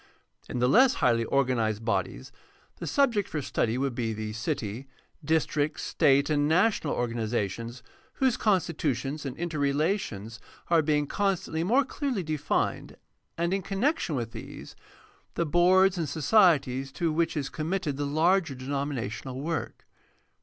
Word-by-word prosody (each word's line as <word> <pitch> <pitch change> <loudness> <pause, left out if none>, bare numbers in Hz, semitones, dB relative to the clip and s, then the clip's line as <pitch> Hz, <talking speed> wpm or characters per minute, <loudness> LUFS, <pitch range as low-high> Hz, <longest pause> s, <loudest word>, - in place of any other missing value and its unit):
In - - -3
the 125 +1 +2
less 255 - +5
highly 115 -2 +2
organized 115 -5 0
bodies 65 - -2 0.5
the - - -6
subjects 240 -8 +2
for 155 - -3
study 120 -4 -1
would 135 -1 -1
be 115 -2 -2
the 110 0 -5
city, 115 0 -4 0.4
district, 155 -1 0
state, 140 0 +3
and 145 -1 +1
national 180 -1 +2
organizations, 115 0 -3 0.3
whose 260 -3 +2
constitutions 150 - -1
and 130 - -6
interrelations 145 - -1 0.3
are 165 -1 +5
being 150 -1 +1
constantly 180 -2 -1
more 250 +9 +3
clearly 265 -7 -2
defined, 155 -2 -2 0.4
and, 170 +2 0
in 195 - 0
connection 200 - -1
with 115 -3 -3
these, - - -9 0.6
the 170 - 0
boards 180 +3 +4
and 160 -4 -2
societies 140 - +3
to 170 -2 0
which 165 0 0
is 140 -2 -2
committed 160 -1 -2
the 145 +1 -2
larger 165 +1 +2
denominational 130 -2 -4
work. 150 -5 -4
150 Hz, 135 wpm, -27 LUFS, 125-175 Hz, 0.6 s, less